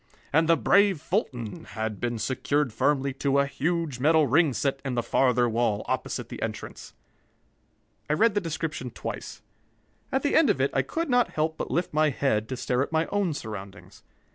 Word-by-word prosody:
And 160 +2 +3
the 165 - +5
brave 200 -4 +4
Fulton 125 - -3
had 110 -2 -4
been 120 -1 -2
secured 130 +3 -1
firmly 140 0 +1
to 140 -1 +2
a 140 - +4
huge 150 0 -2
metal 155 +3 +4
ring 150 +3 +3
set 135 +1 -1
in 135 -3 -3
the 120 - 0
farther 125 0 +2
wall, 115 -2 0
opposite - - -3
the - - -8
entrance. - - -6 1.1
I - - +3
read 220 +7 +3
the 205 - +1
description 160 -6 -4
twice. - - -7 0.7
At 265 - 0
the 285 - +1
end 320 -6 +5
of 145 - +2
it 135 +1 +1
I 135 - +3
could 330 - -3
not 245 -2 +3
help 155 +1 0
but - - -5
lift 175 -1 -1
my 155 0 +3
head 110 -6 0
to 130 - -3
stare 125 +1 0
at 140 - -2
my 160 0 +2
own 200 -6 0
surroundings. 105 -6 -8
140 Hz, 190 wpm, -26 LUFS, 125-165 Hz, 1.1 s, the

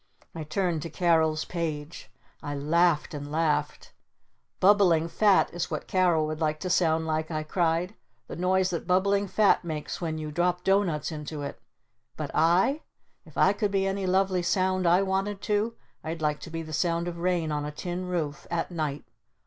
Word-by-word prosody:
I 165 - -5
turned 165 +1 -1
to 165 - -5
Carol's 160 -3 +2
page. 160 -3 -5 0.3
I 145 -1 -4
laughed 160 +3 +2
and 145 -1 -6
laughed. 150 -2 -1 0.7
"Bubbling 185 -5 +4
Fat 200 +3 +3
is 175 - -3
what 155 - -4
Carol 175 -4 +2
would 155 +1 -4
like 155 -1 0
to 185 - -2
sound 160 -2 +2
like!" 155 0 -1
I 155 -2 -2
cried. 170 +3 0 0.3
"The - - -8
noise 185 +1 +1
that 170 -1 -4
Bubbling 200 +2 +2
Fat 205 0 +3
makes 155 -1 -5
when 160 -2 -2
you 155 -1 -5
drop 175 +2 0
doughnuts 180 -6 +1
into 150 -1 -6
it! 140 - -7 0.6
But - - -4
I? 180 - +3 0.5
If - - -14
I - - +5
could 210 -3 -1
be 195 -1 +1
any 195 0 -1
lovely 185 0 +2
Sound 185 0 +1
I 180 +3 +4
wanted 195 +1 -1
to, 210 +2 0 0.3
I'd 160 +1 -4
like 150 -1 0
to - - -9
be 165 0 -4
the 155 0 -9
Sound 170 +2 0
of 170 -1 -5
Rain 175 -3 0
on 150 -1 -1
a 150 - -4
Tin 175 +4 -5
Roof 160 -5 -3
at 170 +1 -2
night! 150 -4 -3
170 Hz, 180 wpm, -27 LUFS, 155-185 Hz, 0.7 s, I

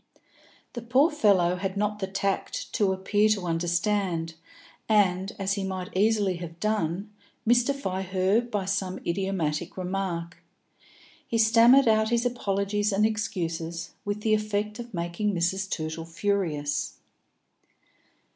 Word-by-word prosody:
The 240 - -5
poor 260 +8 +3
fellow 190 - +3
had 190 +1 -3
not 210 0 -1
the 190 - -2
tact 195 0 -2
to 200 -3 +2
appear 205 +3 +2
to 200 -4 +1
understand, 170 0 0 0.6
and, 195 -2 +3
as 195 0 0
he 200 -1 -2
might 185 -2 -5
easily 205 -2 +2
have 170 -1 -8
done, 205 -2 -1 0.3
mystify 240 -4 +1
her 190 +3 +2
by 210 -5 -3
some 190 -1 -2
idiomatic 175 -3 -2
remark. 180 -2 -3 0.9
He 230 - 0
stammered 230 +4 +6
out 220 0 +3
his 235 +1 +1
apologies 205 -3 0
and 200 +2 +3
excuses, 170 -6 -3
with 205 +1 -3
the 215 0 +2
effect 210 0 -1
of 240 0 -7
making 175 +3 -2
Mrs. 190 +3 0
Tootle 160 -1 -4
furious. 165 -5 -1
195 Hz, 125 wpm, -27 LUFS, 175-215 Hz, 0.9 s, stammered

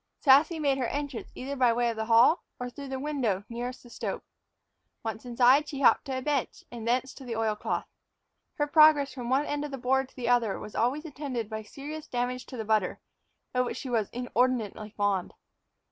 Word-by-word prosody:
Sassy 295 +4 +5
made 280 -3 +1
her 250 - 0
entrance 285 -3 -4
either 275 +2 -5
by 250 -3 +4
way 240 0 +1
of - - -6
the 220 0 -3
hall 235 +8 +5 0.2
or 250 0 -4
through 280 +2 -8
the 265 0 -4
window 260 -10 -1
nearest 245 +2 -5
the 240 - -14
stove. - - -4 0.8
Once 225 +1 -5
inside, 250 +5 +4
she 280 -1 -5
hopped - - +5
to 265 -2 -3
a 260 - -4
bench, 290 -3 -1
and 230 -2 -6
thence 255 +2 +1
to - - -12
the 240 -3 -4
oil 220 -1 0
cloth. 210 - -2 0.7
Her 295 - +1
progress 295 -2 +5
from 245 -3 -5
one 270 +3 +2
end 290 0 -2
of 295 - -4
the 270 - -5
board 265 +1 +1
to - - -26
the 245 -3 -4
other 240 -4 +2
was 210 - -9
always 270 +7 0
attended 265 -7 -4
by 220 0 -3
serious 290 +8 -8
damage 250 +1 -2
to 255 - -8
the 220 - -4
butter, 215 -4 +1 0.5
of 250 0 +2
which - - -4
she 260 - -5
was 220 -4 +1
inordinately 245 -3 -1
fond. 200 -3 0
250 Hz, 210 wpm, -28 LUFS, 230-280 Hz, 0.8 s, Sassy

